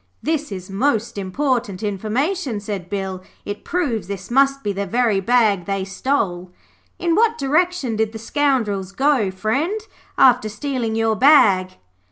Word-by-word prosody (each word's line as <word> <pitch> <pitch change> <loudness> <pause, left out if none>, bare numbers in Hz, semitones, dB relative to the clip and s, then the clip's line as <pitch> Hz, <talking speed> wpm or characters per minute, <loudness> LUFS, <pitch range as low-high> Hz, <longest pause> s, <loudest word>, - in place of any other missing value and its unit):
'This 305 -4 -1
is 185 -2 -6
most 230 +2 0
important 220 0 -2
information,' 225 - -1
said 200 -3 -6
Bill. 190 -2 -4 0.2
'It 205 0 -6
proves 250 - -2
this 195 +1 -7
must 275 +1 +3
be 205 - -1
the 200 +1 -3
very 230 -1 +1
bag 210 -3 +2
they 195 -1 -2
stole. 185 -4 -2 0.5
In 340 -1 0
what 450 +5 +3
direction 300 -4 0
did 220 -1 0
the 220 - -7
scoundrels 220 -6 -1
go, 270 -4 +2
friend, 255 - -1 0.4
after 250 -4 +5
stealing 230 0 -3
your 225 -1 +1
bag?' 205 -8 +5
220 Hz, 145 wpm, -20 LUFS, 195-275 Hz, 0.5 s, after